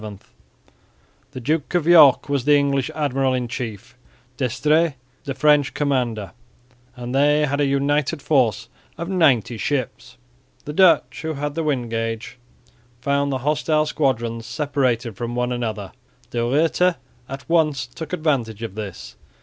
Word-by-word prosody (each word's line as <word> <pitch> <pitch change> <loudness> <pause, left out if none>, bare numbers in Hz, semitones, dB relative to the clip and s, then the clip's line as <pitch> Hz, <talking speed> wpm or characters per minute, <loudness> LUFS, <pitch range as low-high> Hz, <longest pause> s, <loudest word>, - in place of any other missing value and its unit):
The - - -8
Duke 150 +6 -1
of 175 -3 +1
York 160 -6 +7
was 140 -3 -1
the 145 0 +5
English 140 -2 0
admiral 135 -3 0
in 125 -1 -2
chief, 115 -2 -6 0.4
D'Estrées 150 +5 +1 0.3
the 135 - -4
French 145 0 +3
commander, 125 -8 -1 0.6
and 125 0 -6
they 150 +2 +3
had 140 +1 -1
a 145 - +2
united 145 +3 0
force 120 -6 +1 0.3
of 170 +2 -5
ninety 130 - +2
ships. 125 -2 -3 0.5
The 150 - -5
Dutch, 170 -3 +3
who 160 0 -3
had 145 +1 -3
the 165 - -2
wind 130 -7 -1
gauge, 115 +1 -4 0.6
found 140 +2 0
the 135 - 0
hostile 155 +1 +1
squadrons 120 -7 -1
separated 130 -7 -1
from 120 0 -4
one 125 0 -1
another. 110 -5 -4 0.4
De 120 - -2
Ruyter 160 +8 +2 0.3
at 135 +1 -8
once 155 -5 +1
took 145 +5 -9
advantage 135 - -1
of 115 - -5
this. 100 -4 -8
135 Hz, 140 wpm, -21 LUFS, 120-150 Hz, 0.6 s, York